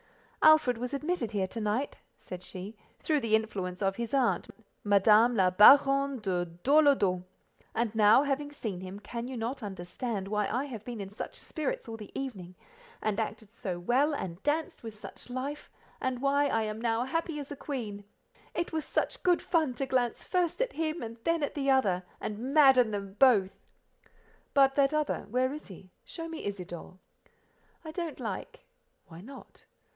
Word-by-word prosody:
"Alfred 310 -7 +6
was 250 +3 -3
admitted 295 -4 -2
here 200 -3 0
to 225 +4 -6
night," 215 +7 -1 0.2
said 180 -1 -9
she, 190 +4 -8 0.2
"through 305 -2 +1
the 225 -4 +2
influence 200 -4 -2
of 195 0 0
his 235 +2 -2
aunt, 260 -3 +1 0.4
Madame 210 +4 +5
la 185 -3 +3
Baronne 275 +7 +6
de 185 -5 -1
Dorlodot; 200 - +3 0.5
and 230 -2 0
now, 215 +4 +6
having 290 +1 -2
seen 210 -10 -5
him, 190 +2 -7
can 235 +3 -6
you 260 -1 -5
not 235 +4 -3
understand 195 +2 -4
why 210 0 0
I 250 +5 -1
have 230 -7 -7
been 235 -1 -6
in 195 -1 -6
such 205 - -7
spirits 305 -6 -4
all 225 0 -6
the 210 -2 -10
evening, 190 -10 -6 0.5
and 215 0 0
acted 215 -1 -4
so 185 -7 -4
well, 265 - +2
and 180 -6 -5
danced 320 +4 -1
with 225 -2 -8
such - - -11
life, 275 +4 -5 0.3
and 260 -1 -1
why 280 +1 +3
I 225 -5 +1
am 215 +1 -4
now 230 0 +1
happy 325 +4 -2
as 285 -1 -8
a - - -4
queen? 245 -8 -5
Dieu! - - -13
Dieu! 205 +1 -32 0.2
It 340 - -5
was 315 -1 -1
such - - -2
good 355 -1 +2
fun 315 -7 +1
to 270 - -2
glance 250 -2 0
first 355 -3 0
at - - -5
him 320 +1 -2
and 230 0 -7
then 330 -2 +1
at 285 - -1
the 275 -2 -1
other, 205 -10 +3 0.2
and 210 0 -4
madden 265 -5 +6
them 200 -2 -5
both." 215 -8 +4 1.0
"But 270 -1 +6
that 280 +1 +3
other—where 260 -3 0
is 305 - -8
he? 185 -1 -13
Show 330 -1 -7
me 325 -1 -7
Isidore." 180 -2 -6 0.9
"I 315 - -6
don't 335 -1 -5
like." - - -6 0.4
"Why 170 -1 -12
not?" 270 +7 -13
240 Hz, 180 wpm, -30 LUFS, 205-280 Hz, 1.0 s, Alfred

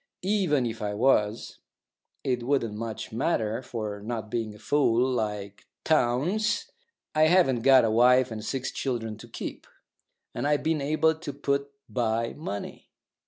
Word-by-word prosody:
Even 185 -10 +2
if 115 -1 -4
I 105 -1 -2
was, 110 -2 +1 0.6
it 125 -2 0
wouldn't 120 -3 0
much 110 +1 -5
matter; 115 -3 0
for, 110 -5 -5
not 110 -1 -5
being 110 -3 -2
a - - -12
fool, 120 +1 +2
like 105 -5 -3 0.2
Townes, 175 - +1 0.4
I 155 0 +5
haven't 160 -8 +4
got 130 -1 +6
a 110 - +1
wife 125 +2 +5
and 110 -1 -5
six 130 +3 -3
children 115 -5 -3
to 120 - -11
keep, 115 - -7 0.7
and - - -2
I've 145 0 +1
been 160 -2 +1
able 155 +3 +2
to 160 -2 -7
put 140 0 -1 0.2
by 115 0 -1
money. 100 -10 -7
120 Hz, 150 wpm, -27 LUFS, 110-145 Hz, 0.7 s, got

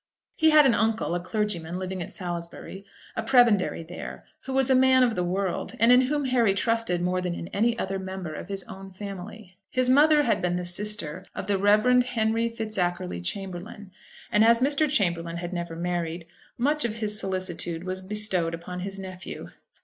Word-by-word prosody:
He 320 - +4
had 305 -1 +7
an 260 - +5
uncle, 220 -4 0
a 175 - 0
clergyman, 180 -3 -2
living 185 0 -4
at - - -6
Salisbury, 175 +2 -6 0.3
a - - -1
prebendary 225 -8 +3
there, 170 +2 -8 0.2
who 265 - -5
was 265 0 +2
a - - +7
man 260 0 +5
of 240 -2 +2
the 180 - -1
world, 185 +1 -2
and 230 +3 +5
in 250 +1 +7
whom 285 +2 0
Harry 235 -6 +2
trusted 230 -6 0
more 180 +1 0
than 180 -1 -2
in 170 - -7
any 230 +3 +1
other 195 -2 -2
member 190 -4 -6
of 155 - -7
his 195 -1 -4
own 195 0 -10
family. 195 0 -9
His 255 -1 +3
mother 300 +2 +6
had 235 - +1
been 175 0 0
the 180 0 -3
sister 185 -2 -2
of - - -4
the 200 -1 0
Rev. 215 +5 +5
Henry 230 -2 0
Fitzackerly 185 - -3
Chamberlaine; 190 - -6 0.4
and 210 -1 +4
as 230 +1 +6
Mr. 285 +3 +2
Chamberlaine 170 - 0
had 175 +1 -5
never 170 -2 -4
married, 170 -1 -3 0.3
much 295 +5 +1
of 220 -2 -2
his 210 -2 -1
solicitude 185 -4 -2
was 185 0 -3
bestowed 190 -4 -1
upon 180 +2 -7
his 195 +2 -5
nephew. 185 -2 -8
195 Hz, 190 wpm, -26 LUFS, 180-230 Hz, 0.4 s, had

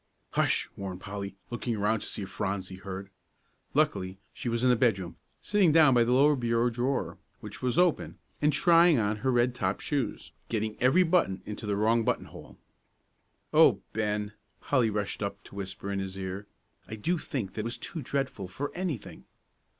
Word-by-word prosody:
"Hush!" - - +1
warned 95 -2 -6
Polly, 100 0 -6 0.2
looking 120 0 -2
around 105 +2 +1
to - - -7
see 100 - -4
if 95 - -7
Phronsie 95 -2 -3
heard. 95 +1 -7 0.6
Luckily, 95 +1 +1 0.2
she 120 - -4
was 115 +1 -1
in 130 - +5
the - - +5
bedroom, 100 -8 +1 0.3
sitting 205 -6 +3
down 155 -4 +6
by 120 -1 +5
the 120 - 0
lower 145 +4 +5
bureau 120 -1 +1
drawer, 125 +4 -1 0.2
which 105 -1 -9
was 125 +3 0
open, 180 -2 +2 0.2
and 150 0 +4
trying 170 +2 +5
on 105 -1 +1
her 130 +5 0
red 120 0 +3
topped 95 -5 -2
shoes, 140 -7 -2 0.2
getting 110 -1 -1
every 135 +9 +5
button 165 - +1
into 105 0 -6
the 100 - +1
wrong 115 +3 +3
button - - 0
hole. - - -13 1.0
"Oh, - - +6
Ben," 105 -1 -1 0.3
Polly 125 -5 +2
rushed 105 -1 -3
up 100 -1 -4
to - - -15
whisper 100 0 -5
in 100 - -1
his 95 0 -5
ear, 95 +2 -5 0.4
"I 110 - -6
do 165 +11 -1
think 115 -12 -4
that 110 - -3
was 115 +2 -3
too 160 +6 -6
dreadful 135 -7 -2
for 135 +10 -4
anything." 175 - -5
110 Hz, 180 wpm, -29 LUFS, 100-130 Hz, 1.0 s, down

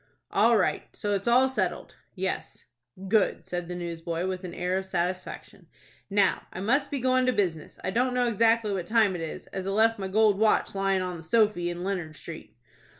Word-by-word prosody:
"All - - +4
right. - - 0
So 205 -2 -2
it's 200 +2 -2
all 250 +2 +5
settled?" 210 -9 -2 0.2
"Yes." 190 0 -4 0.4
"Good!" 210 0 +2
said 175 -1 -4
the 180 - -5
newsboy, 170 0 -4
with 185 0 -3
an 180 -2 -6
air 180 +1 0
of 190 - -8
satisfaction. 185 0 -4 0.4
"Now 200 -2 +2
I - - -7
must 270 +9 +1
be 285 - -2
goin' 255 0 +2
to - - +5
business. 175 -9 -2
I 190 - -1
don't 250 +4 +1
know 245 -1 +2
exactly 230 -1 +2
what 180 -3 -3
time 220 -4 +3
it 170 - -4
is, 160 - -6
as 190 0 -4
I - - 0
left 220 +2 +3
my 195 - -3
gold 210 0 +3
watch 220 0 +2
lyin' 195 -1 +1
on 180 -1 -4
the 165 - -11
sofy 205 -1 +2
in 175 0 -5
Leonard 180 -5 -3
Street." 160 -6 -10
195 Hz, 205 wpm, -27 LUFS, 180-225 Hz, 0.4 s, all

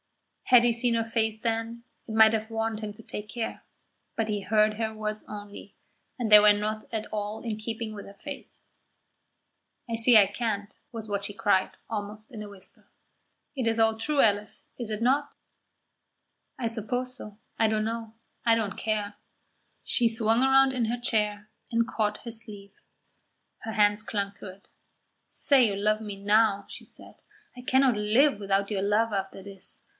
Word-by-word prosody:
Had 245 -2 +7
he 240 - +3
seen 235 0 +1
her 230 - +1
face 220 -1 0
then, 230 +1 -2 0.2
it 220 - -6
might 220 0 +7
have 220 0 -2
warned 225 -1 -2
him 210 -1 -4
to 225 - -14
take 210 0 -7
care; 230 +2 -4 0.5
but 225 - 0
he 210 -2 -2
heard 215 +1 +3
her 220 0 -2
words 215 0 -4
only, 205 -1 -9 0.4
and 235 -3 -1
they 210 0 +10
were 210 0 +7
not 215 +1 -1
at 220 -2 -3
all 210 +1 -3
in 225 -3 -2
keeping 220 0 -5
with 205 - -8
her 200 - -13
face. 285 +6 -9 1.3
"I 230 - -1
see 230 +1 +6
I 205 - +8
can't," 205 -3 -3 0.2
was 225 -2 -7
what 200 -1 -2
she 205 - -2
cried, 200 -3 +1
almost 210 +1 -6
in 215 -2 -6
a 205 - -9
whisper. 200 -2 -14 0.7
"It 260 -3 -2
is 225 0 +1
all 225 0 +4
true, 285 +6 -1
Alice, 210 -3 +2
is 235 -3 -3
it 215 +1 -3
not?" 280 +4 +1 1.2
"I 235 - 0
suppose 245 +3 -3
so. 210 -5 -11 0.2
I 225 - +3
don't 215 0 0
know; 225 0 -4 0.3
I 230 -1 +5
don't 210 -4 -2
care." 210 -1 -2 0.7
She 235 -2 +2
swung 225 +1 +1
round 265 0 +5
in 245 -3 0
her 240 +2 -2
chair 210 -3 0 0.2
and 230 0 +2
caught 210 -1 -2
his 230 -1 -6
sleeve. 200 -3 -11 0.9
Her 220 - -6
hands 205 0 +3
clung 200 -2 -3
to 195 - -10
it. 190 +2 -15 0.6
"Say 270 -5 +4
you 200 - -2
love 215 +2 +1
me 205 -2 -6
now," 205 -1 +3
she - - -9
said. - - -8 0.3
"I 250 - -9
cannot 260 -1 +3
live 215 +4 +3
without 195 0 0
your 200 -3 -1
love 210 +2 +1
after 195 0 -3
this. 195 -1 -9
220 Hz, 180 wpm, -27 LUFS, 205-230 Hz, 1.3 s, they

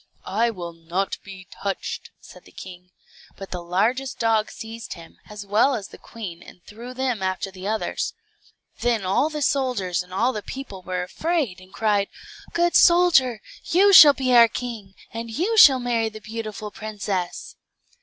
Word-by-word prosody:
"I 230 +4 +1
will 175 -6 -7
not 170 +4 -3
be 190 -2 -11
touched," 200 -1 -4
said - - -16
the - - -17
king. 180 -1 -11 0.5
But 195 - -9
the 180 - -4
largest 220 +10 -1
dog 225 -3 +1
seized 225 +2 -8
him, 165 -2 -14
as 210 -1 -8
well 220 +7 +3
as 200 -4 -6
the - - -14
queen, 185 -7 -9
and 180 - -15
threw 240 +4 -10
them 255 -5 -2
after 190 +1 -2
the 185 0 -8
others. 220 +1 -2 0.6
Then 235 -4 0
the 295 +11 0
soldiers 245 -13 0
and 180 0 -13
all 235 +7 +1
the 210 - -4
people 225 -6 -8
were 180 0 -3
afraid, 265 - -2
and 185 0 -17
cried, 205 -2 +1 0.4
"Good 345 0 +1
soldier, 340 -10 +5 0.2
you 395 +4 +4
shall 300 -5 +10
be 255 -2 0
our 235 -1 +8
king, 225 -4 -7 0.2
and 230 0 -5
you 355 - -1
shall 275 -11 +8
marry 235 -2 0
the 215 0 -11
beautiful 215 0 -6
princess." 205 -5 -5
215 Hz, 165 wpm, -23 LUFS, 190-255 Hz, 0.6 s, shall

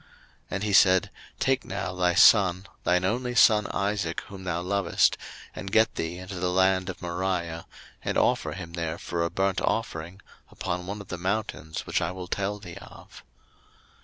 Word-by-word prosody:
01:022:002 - - -27 0.4
And 100 - -3
he 105 -1 -1
said, 95 -1 +5 0.3
Take 130 0 +1
now 95 -2 -4
thy 90 -1 +1
son, 95 -2 +6 0.2
thine 90 +1 +2
only 125 +5 -1
son 105 -4 +5
Isaac, 100 -4 -1
whom 95 -1 -11
thou 85 -1 -2
lovest, 100 +2 +2 0.4
and 95 - -6
get 110 +1 +4
thee 80 +2 -4
into 90 0 -7
the 90 0 0
land 95 0 +2
of 95 - -7
Moriah; 85 -2 -2 0.4
and - - -1
offer - - +1
him 85 0 -8
there 85 -1 -3
for 85 -2 -3
a 85 - 0
burnt 95 0 0
offering 90 -4 -2 0.3
upon 90 +1 -4
one 100 +1 -5
of 100 - -13
the 90 - -5
mountains 95 -4 -3
which - - 0
I 80 - 0
will 90 0 -7
tell 100 +3 -2
thee 90 -5 -10
of. - - -13
95 Hz, 180 wpm, -27 LUFS, 85-100 Hz, 0.4 s, son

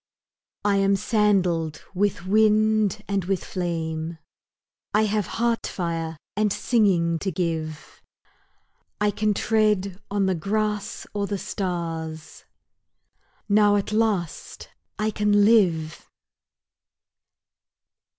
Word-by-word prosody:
I 200 -1 +3
am 195 0 +3
sandaled 190 -7 +1
with 195 -2 0
wind 215 0 +3
and 200 -3 -1
with 190 0 -1
flame, 165 -2 -3 0.8
I 215 - +4
have 210 -2 0
heart 235 0 0
fire 165 -3 -3 0.2
and 210 0 +1
singing 180 -8 +2
to 190 - -2
give, 160 -3 -4 1.0
I 210 0 +2
can 210 0 0
tread 210 -4 +1
on 200 -1 +1
the 190 - +2
grass 210 +3 -2
or 200 -1 -1
the 200 - -2
stars, 165 -5 -5 1.0
Now 205 0 +4
at 205 0 -1
last 215 -7 -1 0.3
I 215 0 0
can 205 -1 +3
live! 170 -9 +2
200 Hz, 100 wpm, -24 LUFS, 170-210 Hz, 1.0 s, I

